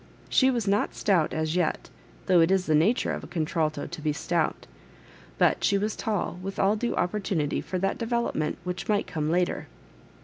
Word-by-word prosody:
She 260 Hz, -, +4 dB
was 235 Hz, -5 st, -1 dB
not 200 Hz, +2 st, +1 dB
stout 180 Hz, -7 st, +2 dB
as 160 Hz, +1 st, -1 dB
yet, 175 Hz, -3 st, -1 dB, 0.3 s
though 180 Hz, -3 st, +5 dB
it 165 Hz, -, +4 dB
is 190 Hz, -1 st, +2 dB
the 155 Hz, -, +1 dB
nature 180 Hz, +11 st, +3 dB
of -, -, -4 dB
a -, -, -8 dB
contralto 155 Hz, -2 st, -1 dB
to 170 Hz, -2 st, -8 dB
be 155 Hz, 0 st, 0 dB
stout; 160 Hz, +2 st, -1 dB, 0.7 s
but -, -, +3 dB
she 200 Hz, -, +3 dB
was 210 Hz, +2 st, -1 dB
tall, 205 Hz, -4 st, -2 dB
with 195 Hz, +1 st, -6 dB
all 200 Hz, +2 st, +3 dB
due 235 Hz, +2 st, -2 dB
opp(»tunity 180 Hz, -6 st, -1 dB
for 185 Hz, -, -3 dB
that 195 Hz, +2 st, -1 dB
de 230 Hz, -, -3 dB
^ -, -, -8 dB
velopment 235 Hz, -10 st, 0 dB
which 180 Hz, +3 st, -5 dB
might 205 Hz, -1 st, +2 dB
oome 155 Hz, -1 st, -2 dB
later. 175 Hz, +2 st, 0 dB
180 Hz, 200 wpm, -27 LUFS, 160-205 Hz, 0.7 s, though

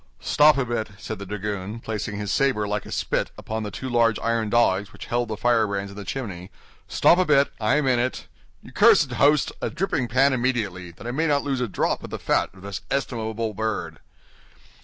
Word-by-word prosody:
"Stop 150 Hz, 0 st, +4 dB
a 135 Hz, -, +1 dB
bit," 115 Hz, -2 st, -2 dB
said 110 Hz, 0 st, -6 dB
the 100 Hz, -, -7 dB
dragoon, 105 Hz, +1 st, -4 dB
placing 110 Hz, -2 st, -4 dB
his 105 Hz, -1 st, -2 dB
saber 130 Hz, -7 st, +1 dB
like 105 Hz, 0 st, -3 dB
a -, -, -9 dB
spit -, -, -1 dB
upon 110 Hz, 0 st, -4 dB
the 105 Hz, -, -4 dB
two 130 Hz, +6 st, -6 dB
large 115 Hz, -3 st, +3 dB
iron 115 Hz, -1 st, -1 dB
dogs 105 Hz, -3 st, +2 dB
which -, -, -10 dB
held 120 Hz, 0 st, -1 dB
the 110 Hz, -1 st, -4 dB
firebrands 105 Hz, -4 st, +1 dB
in -, -, -11 dB
the 105 Hz, -, -7 dB
chimney, 95 Hz, -5 st, -5 dB, 0.4 s
"stop 175 Hz, -, +4 dB
a -, -, +5 dB
bit, 140 Hz, -3 st, +3 dB
I 110 Hz, +5 st, +2 dB
am 150 Hz, -1 st, +1 dB
in 125 Hz, -2 st, +3 dB
it. 130 Hz, +1 st, -2 dB, 0.4 s
You -, -, -13 dB
cursed -, -, +5 dB
host! 145 Hz, +1 st, +3 dB
a -, -, -1 dB
dripping 155 Hz, -6 st, -1 dB
pan 135 Hz, +4 st, +3 dB
immediately, 115 Hz, -8 st, -1 dB
that 85 Hz, +6 st, -13 dB
I 120 Hz, -, -2 dB
may 160 Hz, +6 st, 0 dB
not 145 Hz, -2 st, +2 dB
lose 135 Hz, -3 st, -1 dB
a 125 Hz, -, 0 dB
drop 100 Hz, -, -1 dB
of -, -, -7 dB
the -, -, -4 dB
fat -, -, +1 dB
of 95 Hz, -, -15 dB
this 100 Hz, -5 st, -5 dB
estimable 115 Hz, -5 st, -2 dB
bird." 110 Hz, +2 st, -3 dB
115 Hz, 215 wpm, -24 LUFS, 105-130 Hz, 0.4 s, a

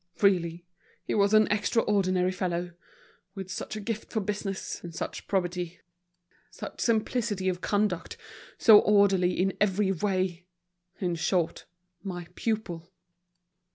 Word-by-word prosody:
Really 175 Hz, -4 st, +2 dB, 0.4 s
he -, -, -3 dB
was 200 Hz, -1 st, +3 dB
an 215 Hz, 0 st, +7 dB
extraordinary 200 Hz, -4 st, +2 dB
fellow: 180 Hz, -1 st, -2 dB, 0.6 s
with 190 Hz, -2 st, -6 dB
such 200 Hz, -, -5 dB
a -, -, -4 dB
gift 215 Hz, +1 st, -5 dB
for 220 Hz, -, 0 dB
business, 200 Hz, -1 st, -4 dB
and 170 Hz, -2 st, -8 dB
such -, -, -5 dB
probity, 180 Hz, -2 st, -2 dB, 0.7 s
such -, -, -8 dB
simplicity 220 Hz, -3 st, 0 dB
of 180 Hz, 0 st, -3 dB
conduct, 205 Hz, -4 st, -1 dB, 0.4 s
so 215 Hz, -2 st, +8 dB
orderly 195 Hz, -4 st, +4 dB
in 190 Hz, +1 st, +1 dB
every 200 Hz, -1 st, +2 dB
way—in 180 Hz, -1 st, -3 dB
short, 170 Hz, +1 st, 0 dB, 0.4 s
my 175 Hz, -2 st, -5 dB
pupil." 185 Hz, -6 st, -3 dB
185 Hz, 120 wpm, -28 LUFS, 175-205 Hz, 0.7 s, so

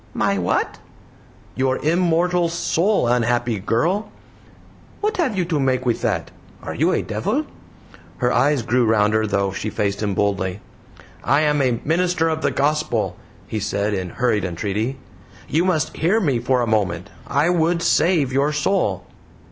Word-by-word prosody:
"My -, -, +1 dB
what?" -, -, -1 dB, 0.7 s
"Your 130 Hz, 0 st, 0 dB
immortal 175 Hz, +1 st, +2 dB
soul, 170 Hz, -, +1 dB
unhappy 120 Hz, -2 st, +1 dB
girl." 165 Hz, -, 0 dB, 0.9 s
"What 425 Hz, +1 st, -1 dB
have 270 Hz, -, 0 dB
you 180 Hz, -, +1 dB
to 165 Hz, -3 st, -1 dB
make 130 Hz, -1 st, 0 dB
with 120 Hz, -2 st, 0 dB
that? 100 Hz, -8 st, -1 dB, 0.3 s
Are -, -, -5 dB
you -, -, +2 dB
a -, -, 0 dB
devil?" -, -, -1 dB, 0.7 s
Her 125 Hz, 0 st, +1 dB
eyes 140 Hz, -1 st, +2 dB
grew 125 Hz, +2 st, +2 dB
rounder, 110 Hz, -1 st, +2 dB
though 100 Hz, -1 st, 0 dB
she 105 Hz, +3 st, -4 dB
faced 100 Hz, 0 st, -2 dB
him 100 Hz, -3 st, -1 dB
boldly. 100 Hz, -1 st, -1 dB, 0.6 s
"I 140 Hz, +7 st, +3 dB
am 150 Hz, -1 st, +2 dB
a 125 Hz, -3 st, +1 dB
Minister 165 Hz, +1 st, +1 dB
of 160 Hz, 0 st, -2 dB
the -, -, +2 dB
Gospel," 145 Hz, -6 st, 0 dB, 0.3 s
he 110 Hz, -, -4 dB
said, 105 Hz, 0 st, -1 dB
in 95 Hz, -2 st, -3 dB
hurried 115 Hz, +1 st, 0 dB
entreaty. 105 Hz, +8 st, -2 dB, 0.5 s
"You 165 Hz, +4 st, +1 dB
must 160 Hz, -7 st, 0 dB
hear 180 Hz, +8 st, +2 dB
me 140 Hz, -, +1 dB
for 125 Hz, +1 st, +1 dB
a 120 Hz, -, 0 dB
moment. 95 Hz, -6 st, -1 dB, 0.2 s
I 160 Hz, -, +2 dB
would 170 Hz, 0 st, +1 dB
save 155 Hz, -7 st, +2 dB
your 140 Hz, +3 st, +2 dB
soul." 150 Hz, -, 0 dB
130 Hz, 155 wpm, -21 LUFS, 105-165 Hz, 0.9 s, I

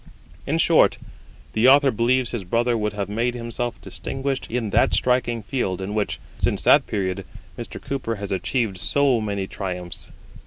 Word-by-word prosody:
In -, -, +1 dB
short, -, -, +4 dB, 0.6 s
the 110 Hz, +3 st, +4 dB
Author 140 Hz, 0 st, +6 dB
believes 120 Hz, +2 st, +1 dB
his 120 Hz, -5 st, -3 dB
brother 120 Hz, +6 st, +1 dB
would 105 Hz, -2 st, -1 dB
have 100 Hz, -2 st, -3 dB
made 115 Hz, +4 st, -1 dB
himself 120 Hz, 0 st, -4 dB
distinguished 135 Hz, 0 st, -4 dB
in 115 Hz, -3 st, -2 dB
that -, -, +3 dB
striking 120 Hz, -2 st, +1 dB
field 100 Hz, -5 st, -2 dB
in 95 Hz, +2 st, -4 dB
which, 105 Hz, -, -1 dB, 0.2 s
since -, -, 0 dB
that -, -, +5 dB
period, 95 Hz, -1 st, -2 dB, 0.3 s
Mr. -, -, -7 dB
Cooper 130 Hz, -5 st, -3 dB
has 100 Hz, -1 st, -6 dB
achieved 100 Hz, 0 st, -1 dB
so 135 Hz, -2 st, +2 dB
many 100 Hz, -2 st, -2 dB
triumphs. 90 Hz, -3 st, -5 dB
115 Hz, 160 wpm, -23 LUFS, 100-125 Hz, 0.6 s, Author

